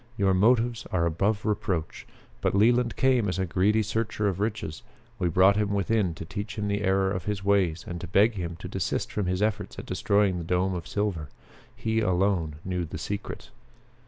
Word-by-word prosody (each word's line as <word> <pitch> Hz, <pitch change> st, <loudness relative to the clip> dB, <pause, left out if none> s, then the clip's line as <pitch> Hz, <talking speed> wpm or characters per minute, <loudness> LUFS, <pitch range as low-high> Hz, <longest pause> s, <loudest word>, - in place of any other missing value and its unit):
Your 95 Hz, -2 st, +3 dB
motives 115 Hz, +4 st, +2 dB
are 85 Hz, -2 st, +1 dB
above 100 Hz, +6 st, 0 dB
reproach. 105 Hz, -7 st, -2 dB, 0.3 s
But -, -, +1 dB
Leland 120 Hz, +3 st, +3 dB
came 125 Hz, -5 st, +2 dB
as 90 Hz, -, -2 dB
a 95 Hz, -, 0 dB
greedy 100 Hz, +5 st, +2 dB
searcher 110 Hz, 0 st, -1 dB
of 95 Hz, -2 st, -1 dB
riches. 105 Hz, -7 st, -3 dB, 0.4 s
We 90 Hz, -3 st, +1 dB
brought 95 Hz, +4 st, +5 dB
him 105 Hz, -1 st, 0 dB
within 100 Hz, -3 st, +1 dB
to 80 Hz, -, -7 dB
teach 100 Hz, +4 st, -6 dB
him 105 Hz, -1 st, -1 dB
the 100 Hz, 0 st, -1 dB
error 95 Hz, -1 st, +2 dB
of 90 Hz, -2 st, -3 dB
his 105 Hz, -2 st, -2 dB
ways 95 Hz, -5 st, +2 dB
and 85 Hz, -1 st, -5 dB
to 90 Hz, -, -5 dB
beg 105 Hz, +6 st, +4 dB
him 85 Hz, -4 st, -4 dB
to -, -, -6 dB
desist 95 Hz, -3 st, -2 dB
from 105 Hz, -3 st, -2 dB
his 90 Hz, +2 st, 0 dB
efforts 105 Hz, -2 st, -2 dB
at -, -, -7 dB
destroying 100 Hz, -3 st, +1 dB
the -, -, -4 dB
dome 90 Hz, +3 st, 0 dB
of 85 Hz, -3 st, -5 dB
silver. 95 Hz, -8 st, -2 dB, 0.5 s
He 110 Hz, 0 st, -1 dB
alone 95 Hz, -5 st, +1 dB
knew 90 Hz, -1 st, -1 dB
the 80 Hz, -, -6 dB
secret." 100 Hz, +5 st, -5 dB
100 Hz, 195 wpm, -27 LUFS, 90-105 Hz, 0.5 s, brought